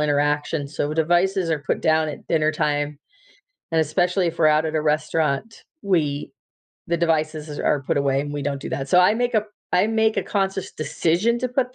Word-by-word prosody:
interaction, 145 Hz, 0 st, 0 dB
so 145 Hz, +1 st, -3 dB
devices 175 Hz, +3 st, +2 dB
are 160 Hz, -, +1 dB
put -, -, -1 dB
down 160 Hz, -1 st, +2 dB
at 150 Hz, -, -8 dB
dinner 155 Hz, -1 st, +1 dB
time. 150 Hz, -1 st, -1 dB, 0.7 s
And 165 Hz, -1 st, +2 dB
especially 180 Hz, +3 st, +1 dB
if 165 Hz, -, -7 dB
we're -, -, +4 dB
out 155 Hz, +1 st, +4 dB
at 160 Hz, -, -3 dB
a 155 Hz, -, +2 dB
restaurant, 155 Hz, +5 st, -1 dB, 0.2 s
we 150 Hz, -7 st, 0 dB, 0.5 s
the 170 Hz, -, 0 dB
devices 155 Hz, -2 st, -1 dB
are 145 Hz, -, +1 dB
put 135 Hz, -, 0 dB
away 140 Hz, -1 st, +1 dB
and 145 Hz, 0 st, -6 dB
we 145 Hz, -, -3 dB
don't 140 Hz, -1 st, -3 dB
do -, -, -6 dB
that. 135 Hz, 0 st, -3 dB
So 180 Hz, -, +5 dB
I 180 Hz, +3 st, +6 dB
make 245 Hz, +2 st, -1 dB
a 215 Hz, -1 st, +2 dB, 0.3 s
I 180 Hz, +3 st, +4 dB
make 220 Hz, 0 st, +2 dB
a -, -, +1 dB
conscious 195 Hz, -2 st, -2 dB
decision 170 Hz, +9 st, 0 dB
to 255 Hz, -, -1 dB
put 250 Hz, 0 st, -1 dB
160 Hz, 200 wpm, -22 LUFS, 150-180 Hz, 0.7 s, I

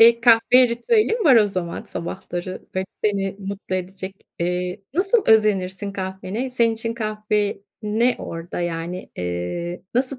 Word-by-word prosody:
Eee, 235 Hz, +1 st, +8 dB
kahve 240 Hz, +2 st, +6 dB
ritüelin 430 Hz, -, +1 dB
var 265 Hz, -6 st, +7 dB
o 215 Hz, -, +6 dB
zaman 185 Hz, -4 st, -3 dB
sabahları, 180 Hz, +1 st, -5 dB
böyle, 190 Hz, 0 st, -1 dB, 0.2 s
seni 195 Hz, -2 st, 0 dB
mutlu 195 Hz, -1 st, -5 dB
edecek. 190 Hz, +1 st, -4 dB, 0.2 s
Eee, 180 Hz, +1 st, -2 dB
nasıl 390 Hz, +6 st, +3 dB
özenirsin 200 Hz, -2 st, +3 dB
kahvene? 190 Hz, +6 st, -4 dB
Senin 235 Hz, -2 st, +3 dB
için 230 Hz, +1 st, -1 dB
kahve 215 Hz, -2 st, -1 dB, 0.2 s
ne 225 Hz, +4 st, +2 dB
orada, 165 Hz, +1 st, -5 dB
yani, 175 Hz, +1 st, -4 dB
eee, 90 Hz, -, -3 dB
nasıl 260 Hz, +1 st, +1 dB
200 Hz, 135 wpm, -22 LUFS, 180-235 Hz, 0.2 s, Eee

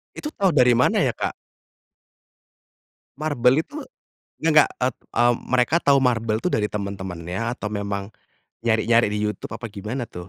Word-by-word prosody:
Itu 300 Hz, -, -5 dB
tau 200 Hz, -8 st, +1 dB
dari 125 Hz, -3 st, +6 dB
mana 120 Hz, +1 st, +3 dB
ya, -, -, +2 dB
Kak? -, -, -3 dB, 1.9 s
MarBel 135 Hz, -5 st, +2 dB
itu 295 Hz, -, -15 dB, 0.7 s
nggak 155 Hz, -2 st, +5 dB
ep 125 Hz, +1 st, +1 dB, 0.2 s
mmm, 120 Hz, 0 st, +4 dB, 0.2 s
mereka 130 Hz, +5 st, +3 dB
tahu 140 Hz, -1 st, +4 dB
MarBel 115 Hz, -4 st, +1 dB
itu 180 Hz, -, 0 dB
dari 105 Hz, -, +1 dB
teman-temannya 95 Hz, +1 st, -4 dB
atau 105 Hz, -4 st, -5 dB
memang 100 Hz, -1 st, -3 dB, 0.6 s
nyari-nyari 115 Hz, 0 st, +3 dB
di 105 Hz, -, -1 dB
YouTube 105 Hz, -, -6 dB
apa 115 Hz, -, -7 dB
gimana 110 Hz, +5 st, -4 dB
tuh, 90 Hz, 0 st, -9 dB
115 Hz, 145 wpm, -23 LUFS, 100-130 Hz, 1.9 s, dari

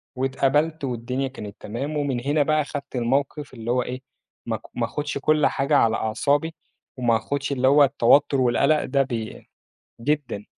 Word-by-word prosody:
واتقبلت 140 Hz, +4 st, 0 dB
والدنيا 125 Hz, +1 st, -2 dB
كانت 105 Hz, -6 st, -9 dB
تمام 140 Hz, +8 st, -4 dB
ومن 140 Hz, -4 st, -1 dB
هنا 145 Hz, +1 st, +2 dB
بقى 155 Hz, 0 st, +1 dB
خدت 140 Hz, -1 st, -7 dB
الموقف 135 Hz, +4 st, -1 dB
اللي 115 Hz, -1 st, -4 dB
هو 125 Hz, +1 st, +2 dB
إيه، 125 Hz, +1 st, -6 dB, 0.4 s
ما -, -, -2 dB
ك -, -, -23 dB, 0.2 s
ما 120 Hz, -, +1 dB
آخُدش 145 Hz, +4 st, -4 dB
كل 150 Hz, +2 st, +3 dB
حاجة 140 Hz, +2 st, +1 dB
على 110 Hz, -3 st, +3 dB
أعصابي، 145 Hz, +10 st, 0 dB, 0.4 s
وما 120 Hz, -3 st, +2 dB
آخُدش 140 Hz, +5 st, -3 dB
اللي 130 Hz, -1 st, +1 dB
هو 145 Hz, +2 st, +6 dB
التوتُّر 140 Hz, +1 st, +3 dB
والقلق 140 Hz, +5 st, +2 dB
ده 140 Hz, +1 st, +2 dB
بي 115 Hz, -4 st, -6 dB, 0.5 s
جدًا. 140 Hz, -7 st, -2 dB
135 Hz, 165 wpm, -24 LUFS, 120-145 Hz, 0.5 s, هو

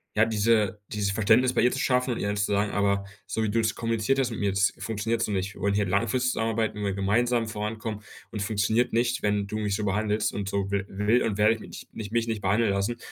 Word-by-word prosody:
ja, 105 Hz, +1 st, +5 dB
diese 110 Hz, -2 st, +1 dB
dieses 100 Hz, -2 st, -1 dB
Verständnis 110 Hz, +5 st, +3 dB
bei -, -, +2 dB
ihr 125 Hz, -, +4 dB
zu -, -, -3 dB
schaffen 125 Hz, -1 st, +1 dB
und -, -, -5 dB
ihr -, -, -2 dB
dann 105 Hz, -, -1 dB
zu 100 Hz, -, +2 dB
sagen: 100 Hz, 0 st, +1 dB
„Aber 100 Hz, -1 st, +1 dB, 0.2 s
so 110 Hz, -, -1 dB
wie 105 Hz, -, 0 dB
du 115 Hz, -, +1 dB
es 110 Hz, 0 st, 0 dB
kommuniziert 115 Hz, +3 st, 0 dB
hast 130 Hz, -2 st, +1 dB
mit 115 Hz, -, -5 dB
mir, 100 Hz, -1 st, +1 dB
das 100 Hz, +1 st, +2 dB
funktioniert 115 Hz, +1 st, -2 dB
so 105 Hz, -, 0 dB
nicht. 95 Hz, 0 st, -2 dB
Wir -, -, -13 dB
wollen 100 Hz, +1 st, +1 dB
hier 105 Hz, 0 st, +2 dB
langfristig 115 Hz, +7 st, +1 dB
zusammenarbeiten, 110 Hz, -2 st, -1 dB
wollen 105 Hz, -, -3 dB
hier 100 Hz, -, -1 dB
gemeinsam 115 Hz, +4 st, +1 dB
vorankommen 110 Hz, 0 st, -4 dB, 0.3 s
und 105 Hz, -3 st, -4 dB
funktioniert 110 Hz, +3 st, +1 dB
nicht, 120 Hz, +2 st, +1 dB
wenn 105 Hz, -1 st, +1 dB
du 110 Hz, -, -4 dB
mich 105 Hz, -2 st, -1 dB
so 105 Hz, 0 st, -2 dB
behandelst 105 Hz, +2 st, 0 dB
und 100 Hz, -1 st, -3 dB
so 100 Hz, -1 st, -2 dB
will 100 Hz, -1 st, 0 dB
will 105 Hz, +5 st, +2 dB
und 105 Hz, -2 st, -1 dB
werde 105 Hz, +1 st, +5 dB
ich 110 Hz, -, -11 dB, 0.3 s
mich 105 Hz, -1 st, -7 dB
mich 115 Hz, 0 st, 0 dB
nicht 110 Hz, -2 st, -2 dB
behandeln 100 Hz, +2 st, +2 dB
lassen. 100 Hz, +5 st, -1 dB
105 Hz, 250 wpm, -26 LUFS, 100-115 Hz, 0.3 s, ja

